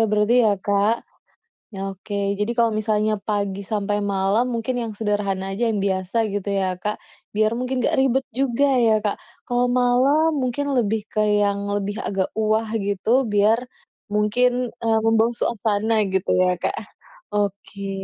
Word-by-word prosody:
berarti 210 +3 +2
ya, 210 -3 +3
Kak. 205 +3 +2 0.8
Oke, 200 +1 -3
jadi 210 - 0
kalau 230 -1 +3
misalnya 215 -1 0
pagi 200 -1 -2
sampai 205 0 -2
malam 200 +4 +1
mungkin 245 +2 -2
yang 225 -2 -4
sederhana 200 -3 -1
aja, 230 +4 0
yang 220 - 0
biasa 190 +2 -2 0.2
gitu 205 0 -3
ya 195 -2 0
Kak. 210 +1 -2 0.4
Biar 215 +1 +3
mungkin 255 0 -2
nggak - - +2
ribet 265 0 +2
juga 265 +1 +1 0.2
ya, 220 -2 +4
Kak. 205 - 0 0.3
Kalau 245 0 +1
malam 255 +6 +3
mungkin 280 +3 -1
lebih 220 -4 0
ke 215 - 0 0.2
yang 200 0 0
lebih, 205 +2 -2
agak 195 -4 -2
wah 220 0 0
gitu 215 +6 +1
biar 210 +3 +3 0.5
mungkin 245 +4 +1 0.3
membangun 225 +1 +3
suasana 220 0 0
gitu, 190 -1 -1
ya 180 0 +3
Kak - - -2 0.5
oke. 200 -1 -3
215 Hz, 145 wpm, -22 LUFS, 200-235 Hz, 0.8 s, ya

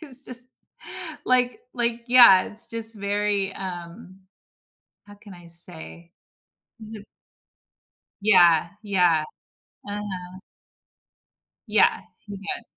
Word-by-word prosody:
he's 275 -4 -3
just 250 -1 +2 0.8
like 250 -1 +1
like 235 -1 -1
yeah, 240 -7 +8
it's 220 +3 -7
just 230 0 -3
very, 205 -1 -1
um- 180 0 -9 0.9
how 205 - -14
can 205 -1 -14
I 175 -1 -15
say?- 170 0 -10 0.7
zi 215 -1 -9 1.2
Yeah, 175 -5 +5
yeah. 180 -6 +2 0.6
Uh-huh. 190 -3 -7 1.3
Yeah, - - +3 0.3
he 205 -1 -8
did. 200 +4 -5
200 Hz, 95 wpm, -24 LUFS, 180-230 Hz, 1.3 s, yeah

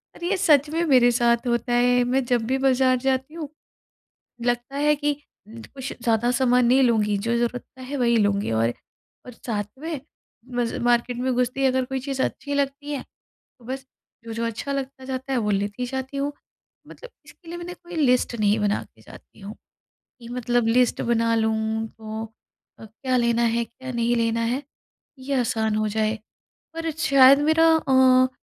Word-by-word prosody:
अरे, 345 - -4
ये 395 - +1
सच 300 -6 +4
में 325 +2 -1
मेरे 250 -4 +5
साथ 235 0 +2
होता 240 +1 0
है। 245 0 +3
मैं 260 +2 +1
जब 240 -2 0
भी 265 +2 +1
बाज़ार 260 -1 +3
जाती 265 +3 -1
हूँ, 315 -4 -6 1.0
लगता 245 +2 -1
है 295 +1 +3
कि 290 0 0 0.4
कुछ 260 +4 -8
ज़्यादा 235 +1 +2
सामान 250 0 +3
नहीं 265 +2 +5
लूँगी, 215 -4 +2
जो 230 +4 -1
ज़रूरत 240 +1 -1
का 260 - -13
है 275 +3 -5
वही 235 -2 +3
लूँगी। 205 - +1
और, 115 +1 +1 0.5
और 250 - -9
साथ 215 -3 -3 0.2
में 315 -1 -4 0.6
मज़ 240 -1 -1
मार्केट 240 0 +1
में 255 +1 0
घुसते 250 +2 -1
ही - - +3
अगर 260 0 +1
कोई 265 0 -3
चीज़ 270 0 -3
अच्छी 285 - -4
लगती 280 +1 -2
है, 285 - -3 0.6
तो 235 - -18
बस 265 +2 -5 0.4
जो-जो 230 0 -4
अच्छा 230 +5 -4
लगता 270 -1 -5
जाता 265 +1 -5
है, - - +1
वो 210 -2 -1
लेती 205 +5 -2
जाती 265 +2 -5
हूँ। 280 +1 -1 0.6
मतलब - - -12 0.2
इसके 345 - -18
लिए 345 - -6
मैंने 350 +1 -7
कोई 350 -1 -12
लिस्ट 250 -5 +2
नहीं 210 0 +3
बना 205 0 0
के - - -24
जाती - - -16
हूँ, 200 +1 -8 0.7
कि 235 - -11
मतलब 245 -1 0
लिस्ट 245 +2 +2
बना 230 -1 +1
लूँ, 220 0 0
तो 220 0 -7 0.6
अ, - - -10
क्या 255 +4 -3
लेना 235 -1 +2
है, 235 0 +1
क्या 260 +3 -9
नहीं 235 0 +1
लेना 230 0 0
है, 245 +5 -1 0.6
ये 275 +2 -4
आसान 220 -2 0
हो 215 0 0
जाए। 215 +1 -1 0.6
पर 330 0 -3
शायद 275 -4 +6
मेरा 315 +2 +4
अ, 260 -3 +4
250 Hz, 185 wpm, -24 LUFS, 230-270 Hz, 1.0 s, शायद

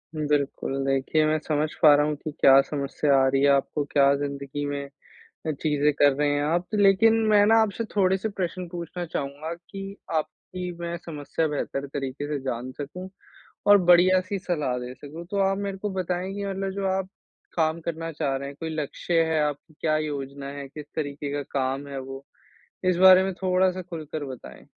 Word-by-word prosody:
बिल्कुल, 145 -3 -1
देखिए, 135 +3 +1
मैं 155 0 +2
समझ 150 0 +1
पा 150 -3 +8
रहा 145 - +3
हूँ 150 0 -1
कि 155 +1 -6
क्या 135 -1 +6
समस्या 140 0 0
आ 135 - +4
रही 135 0 +1
है 140 - +5
आपको, 140 +2 +1
क्या 140 -1 +4
ज़िंदगी 140 0 -4
में 140 0 -3 0.6
अ, 155 - +2
चीज़ें 150 0 +1
कर 145 0 +5
रहे 145 +1 +1
हैं 145 0 +1
आप, 170 +4 0
लेकिन 205 +2 +5
मैं 205 -1 +5
ना 225 - +5
आपसे 220 +1 -1
थोड़े 190 -1 +3
से 220 +3 -3
प्रश्न 185 -2 -4
पूछना 175 0 -5
चाहूँगा 155 +1 -4
कि 195 +3 -9 0.2
आपकी 180 +3 -4
मैं 170 0 -3
समस्या 155 0 -2
बेहतर 140 -1 -3
तरीके 140 +1 -4
से 150 -1 -2
जान 125 -1 -3
सकूँ 180 +6 -7 0.6
और 205 - +9
बढ़िया-सी 185 +2 +5
सलाह 150 -9 -1
दे 125 0 -6
सकूँ। 150 +5 -9
तो 200 - -1
आप 195 - -1
मेरे 200 -1 -3
को 205 +1 -3
बताएँ 185 0 -2
कि 200 - -4
मतलब 195 0 -2
जो 200 0 -2
आप 190 - -4 0.5
काम 160 0 +1
करना 165 0 -4
चाह 145 -3 -1
रहे 140 +1 -5
हैं, 140 - -10
कोई 165 - -3
लक्ष्य 160 +2 0
है 155 - +2
आप 150 -1 -1 0.2
क्या 155 -1 +2
योजना 140 -2 -4
है, 140 0 -6
किस 150 +2 -9
तरीके 145 -2 -3
का 145 0 -2 0.2
काम 135 +2 -1
है 140 -1 -5
वो? 135 +1 -8 0.6
इस 185 -1 +3
बारे 185 +1 +8
में 190 - -1
थोड़ा-सा 185 0 +2
खुलकर 155 -4 -6
बताएँ। 130 -3 -10
155 Hz, 190 wpm, -25 LUFS, 140-185 Hz, 0.6 s, और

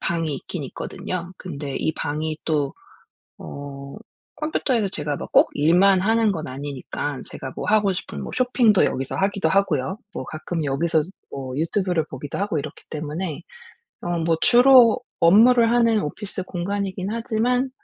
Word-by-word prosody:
방이 165 -3 -1
있긴 150 +3 -6
있거든요. 175 +6 -5
근데 145 -6 -6
이 160 - 0
방이 155 +1 -3
또 145 -3 0 0.6
어 140 -1 -8 0.4
컴퓨터에서 260 -8 0
제가 150 -5 -3
뭐 - - -6
꼭 - - +5
일만 180 +6 +4
하는 225 +1 +3
건 160 -4 -4
아니니깐 140 +1 -5
제가 130 - -7
뭐 - - -3
하고 210 -2 +3
싶은 - - -6
뭐 - - -6
쇼핑도 245 -5 +4
여기서 135 0 -2
하기도 195 0 +1
하고요. 190 -5 +1 0.2
뭐 - - -4
가끔 160 +1 -4
여기서 155 +3 +1 0.3
뭐 130 -2 -6
유튜브를 170 0 0
보기도 140 0 -7
하고 200 -4 -1
이렇기 140 - -6
때문에 155 +2 -4 0.6
어 175 -1 -1
뭐 165 0 +1
주로 245 -1 +7 0.2
업무를 230 +7 +6
하는 230 -2 +3
오피스 190 +5 -5
공간이긴 190 +1 -3
하지만 235 +3 0
175 Hz, 315 characters per minute, -23 LUFS, 150-210 Hz, 0.6 s, 주로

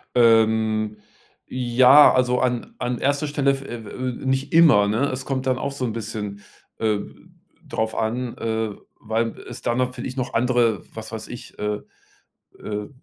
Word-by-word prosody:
Ähm, 110 -2 +3 0.5
ja, 130 +3 +6
also 125 -1 +2
an 125 -2 -1
an 125 0 -2
erster 145 +2 0
Stelle, 140 -1 +1
v 135 - -9
äh 120 - -6
äh, 125 +4 -5
nicht 135 +3 -1
immer, 150 -12 +6
ne? 120 +7 +1
Es 130 0 -5
kommt 130 -1 -2
dann 130 - +2
auch 140 +1 -3
so 135 -2 -3
'n 110 - -2
bisschen, 105 -2 -5 0.4
äh, 105 -2 +1 0.7
drauf 110 0 -2
an, 120 +2 -2
äh, 110 -1 -2 0.3
weil 115 +1 -2
es - - -8
dann 120 - -1
natürlich 125 0 -3
noch 130 -2 -3
andere, 120 -4 +2
was - - -7
weiß - - -6
ich, - - -10
äh, 105 0 -2 0.8
äh 105 -1 -5
120 Hz, 160 wpm, -23 LUFS, 110-130 Hz, 0.8 s, ja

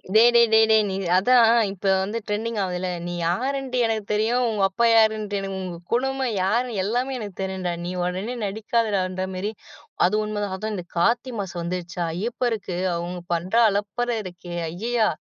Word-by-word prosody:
டேய் 235 +2 +7
டேய் 235 0 +7
டேய் 220 0 +7
டேய். 220 -1 +5
நீ 190 - -2 0.2
அதான். 235 +3 +5 0.2
இப்ப 200 +1 -11 0.2
வந்து 205 +4 -2
டிரெண்டிங் 220 +2 -2
ஆவுதுல்ல. 180 0 -2 0.2
நீ 175 - -4
யாருன்ட்டு 260 +7 -1
எனக்குத் 220 -2 -2
தெரியும். 230 +4 +2
உங்க 210 -3 0
அப்பா 235 +5 +1
யாருன்ட்டு, 215 -2 +3
எனக்கு 195 -1 -4
உங்க 180 -2 -5 0.2
குடும்பம் 265 0 0
யாருன்னு 235 +4 0
எல்லாமே 245 +6 -1
எனக்குத் 205 -5 -8
தெரியும்டா. 190 -2 -2
நீ 180 - -3
உடனே 185 +7 -2
நடிக்காதடான்ற 200 -3 -1
மாரி. 205 +4 -2 0.5
அது 185 +4 +2
உண்ம 210 -1 -3
தான். 195 -2 -3
அதும் 215 +2 -4
இந்தக் 180 -3 -7
கார்த்தி 240 +8 +2
மாசம் 180 -3 -4
வந்துருச்சா? 175 0 -3
ஐயப்பருக்கு 225 -1 -2 0.2
அவங்க 175 +1 -4
பண்ற 175 +4 -3 0.2
அலப்பற 205 +4 -2
இருக்கே. 175 -1 -8 0.2
ஐயையா! 225 +5 0
210 Hz, 165 wpm, -24 LUFS, 185-230 Hz, 0.5 s, டேய்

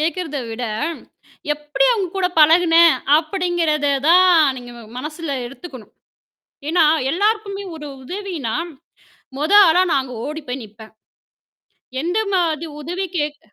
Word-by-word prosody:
கேட்கிறத 320 -2 -2
விட, 235 +2 -5 0.9
எப்படி 295 +10 -1
அவங்க 400 -6 -1
கூட 375 -1 +1
பழகுனேன் 330 +1 +6 0.2
அப்படிங்கிறத 330 -3 -1 0.2
தான் 365 +1 +6 0.2
நீங்க 245 -1 -9
ம - - -11 0.2
மனசுல 305 +3 -6 0.2
எடுத்துக்கணும். 260 -3 -11 0.8
ஏன்னா 335 0 +3 0.3
எல்லாருக்குமே 405 +3 -1
ஒரு 300 -1 -8 0.2
உதவினா, 345 - -5 0.8
மொத 305 +6 -2 0.2
ஆளா 340 +3 +4
நான் 275 - +2
அங்க 255 -2 -9
ஓடி 305 +1 -6
போய் 250 +1 -4
நிப்பேன். 220 +1 -14 1.1
எந்த 355 +6 -1 0.2
மாரி 335 -3 0 0.2
உதவி 355 +5 -4
கேக்க 295 -7 -5
320 Hz, 120 wpm, -19 LUFS, 285-360 Hz, 1.1 s, பழகுனேன்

